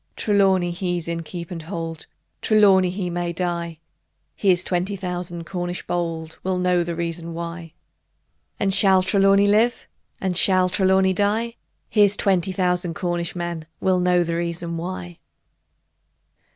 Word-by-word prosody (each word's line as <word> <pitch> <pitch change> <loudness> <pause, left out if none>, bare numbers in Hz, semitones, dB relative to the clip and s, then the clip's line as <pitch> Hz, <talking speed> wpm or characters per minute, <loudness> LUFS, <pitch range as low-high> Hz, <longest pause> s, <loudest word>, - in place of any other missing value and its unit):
Trelawny 190 -4 +2
he's 175 -2 -3
in 170 0 -2
keep 170 +1 -8
and 170 -2 -5
hold; 165 -1 -6 0.3
Trelawny 195 -4 +5
he 180 -1 -3
may 175 0 -2
die: 170 -1 -3 0.6
Here's 185 -3 +2
twenty 185 +2 -1
thousand 180 -2 -5
Cornish 175 0 -4
bold 165 -2 -3
Will 185 0 0
know 180 -1 +2
the 170 0 -4
reason 170 0 -4
why 170 -1 -6 0.9
And 195 -1 +1
shall 190 -1 +4
Trelawny 195 +1 +4
live? 220 +4 +2 0.3
Or 190 -1 -1
shall 185 +1 +3
Trelawny 190 0 +3
die? 215 +4 0 0.3
Here's 205 -2 +4
twenty 190 -1 +1
thousand 180 -2 0
Cornish 175 -1 -2
men 170 -2 -4
Will 185 -1 +2
know 180 0 +3
the 165 0 -2
reason 170 0 -3
why! 175 0 -6
180 Hz, 140 wpm, -22 LUFS, 170-190 Hz, 0.9 s, Trelawny